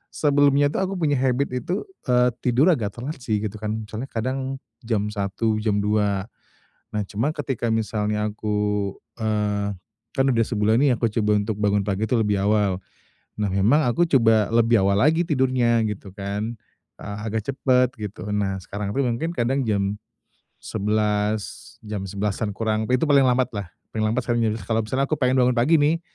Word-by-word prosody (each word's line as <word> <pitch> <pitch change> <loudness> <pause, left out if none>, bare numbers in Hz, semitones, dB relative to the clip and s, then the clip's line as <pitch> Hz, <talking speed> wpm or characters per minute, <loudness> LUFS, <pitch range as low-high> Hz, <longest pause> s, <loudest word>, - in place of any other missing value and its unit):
sebelumnya 145 -1 +3
itu - - -2
aku 190 0 -1
punya 150 -6 +1
habit 130 +1 +1
itu, 125 - -2 0.3
eee, 125 0 +4
tidur 130 +8 +3
agak 110 - -1
telat 135 +5 -6
sih 110 -4 -1
gitu 105 0 -4
kan 110 0 -2
misalnya 110 +5 -6
kadang, 130 +3 -3 0.3
jam 105 -2 0
1 105 +2 -1
jam 105 -2 0
2, 105 -1 0 0.6
nah 105 -1 -2
cuman 115 +11 -2
ketika 135 -5 -2
misalnya 105 -1 -1
aku, 105 -2 -1 0.2
eee, 105 -2 -1 0.4
kan 135 - +1
udah 115 -4 +3
sebulan 110 -1 +2
nih 145 - +4
aku 115 - +1
coba 105 0 +1
untuk 105 +1 -2
bangun 100 -1 +2
pagi 100 0 -1
itu 125 - +1
lebih 105 -2 +1
awal, 100 -2 +2 0.6
nah 105 - +1
memang 100 +11 +3
aku 145 +9 +2
coba 110 -3 +3
lebih 115 -2 +4
awal 100 0 +3
lagi 160 +4 +4
tidurnya 130 -7 +2
gitu 100 -1 -6
kan, 105 +4 -4 0.4
eee, 100 0 -7
agak 110 0 -2
cepet 125 -1 +3
gitu 105 -2 -7
nah 100 -2 0
sekarang 100 +2 -5
itu 135 +5 0
mungkin 125 +8 -1
kadang 130 +4 +1
jam, 100 -3 0 0.7
11 105 0 -1
jam 105 -3 -5
11-an 100 +1 -2
kurang 110 0 -1
itu 125 +2 +1
paling 140 -3 +5
lambat 125 0 +2
lah 100 -4 -5 0.2
paling 110 -1 -1
lambat 115 +4 0
sekarang 120 -1 +1
jadi 110 - 0
kalau 110 +3 -1
misalnya 135 +4 -1
aku 155 - 0
pengen 130 0 +2
bangun 125 0 +3
pagi 145 +8 +4
nih, 155 +2 +2
110 Hz, 175 wpm, -23 LUFS, 105-130 Hz, 0.7 s, paling